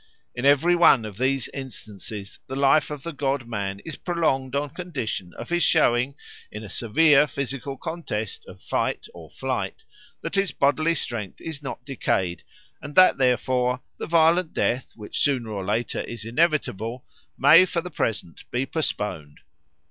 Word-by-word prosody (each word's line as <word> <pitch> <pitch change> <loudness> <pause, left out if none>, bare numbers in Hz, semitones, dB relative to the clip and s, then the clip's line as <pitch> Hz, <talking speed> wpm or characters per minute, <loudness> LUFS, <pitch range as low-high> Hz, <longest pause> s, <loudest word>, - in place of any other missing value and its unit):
In 125 +2 -4
every 145 +5 +5
one 150 -9 +6
of 105 -1 -8
these 130 -1 +1
instances 105 -6 -8
the 130 - -5
life 140 +2 +4
of 150 -2 -6
the 170 - -5
god 140 -2 -1
man 100 -4 -3
is 160 - -7
prolonged 140 -7 0
on 145 0 -1
condition 130 - -4
of - - -8
his 175 0 +1
showing, 135 -5 +3 0.4
in 105 +1 -7
a 100 - -9
severe 150 +5 +4
physical 140 0 -4
contest 170 - -4
of - - -13
fight - - -1
or - - -12
flight, 445 - -3 0.4
that - - -5
his 195 -1 +1
bodily 155 +4 +2
strength 115 - -4
is 160 -3 -6
not 135 -3 -7
decayed, 95 -10 -1 0.4
and 145 - -8
that, 185 -6 +7
therefore, 125 0 +1 0.2
the - - -4
violent 165 +1 +3
death, 125 +2 0
which 105 -2 -6
sooner 125 -6 +1
or 100 -2 -3
later 110 +5 -1
is 115 -2 -7
inevitable, 125 - 0 0.3
may 150 +6 +8
for 180 -2 -1
the 180 +1 -8
present 100 - -3
be 125 +2 -1
postponed. 105 - -3
135 Hz, 160 wpm, -25 LUFS, 115-160 Hz, 0.4 s, may